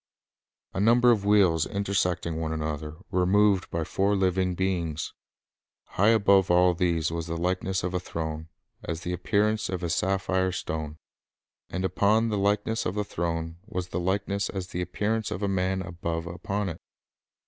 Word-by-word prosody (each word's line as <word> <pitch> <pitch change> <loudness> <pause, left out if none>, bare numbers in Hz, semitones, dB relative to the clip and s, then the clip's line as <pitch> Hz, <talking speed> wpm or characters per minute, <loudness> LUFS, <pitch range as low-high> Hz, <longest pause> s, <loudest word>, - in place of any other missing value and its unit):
A - - -3
number 120 +4 +5
of 105 -4 +1
wheels, 95 -6 +4
intersecting 95 -4 -1
one 80 -1 -2
another, 75 -1 -3 0.2
were 90 -2 +2
moved 100 -1 +3
by 85 - -2
four 100 +5 +1
living 95 -1 +1
beings. 85 -4 -2 0.8
High 100 - +2
above 100 -4 +4
all 90 +1 +5
these 85 -3 0
was 85 0 -3
the 85 0 -3
"likeness 90 +1 -1
of 90 0 -2
a 90 - +1
throne, 80 -2 -5 0.3
as 80 0 -4
the 90 0 -3
appearance 105 +3 +1
of 90 -1 -3
a 85 - -1
sapphire 95 0 +1
stone; 80 -3 -4 0.7
and 90 +1 -2
upon 110 +4 +2
the 105 -2 0
likeness 105 +3 +1
of 90 - -3
the 105 - 0
throne 85 -2 -3
was 90 -4 -4
the 90 - -2
likeness 100 +2 -1
as 95 -2 -5
the 90 - -3
appearance 110 +4 -1
of 95 - -4
a - - +2
man 95 0 0
above 85 -2 -4
upon 95 +3 -3
it." 80 - -8
90 Hz, 170 wpm, -27 LUFS, 85-100 Hz, 0.8 s, number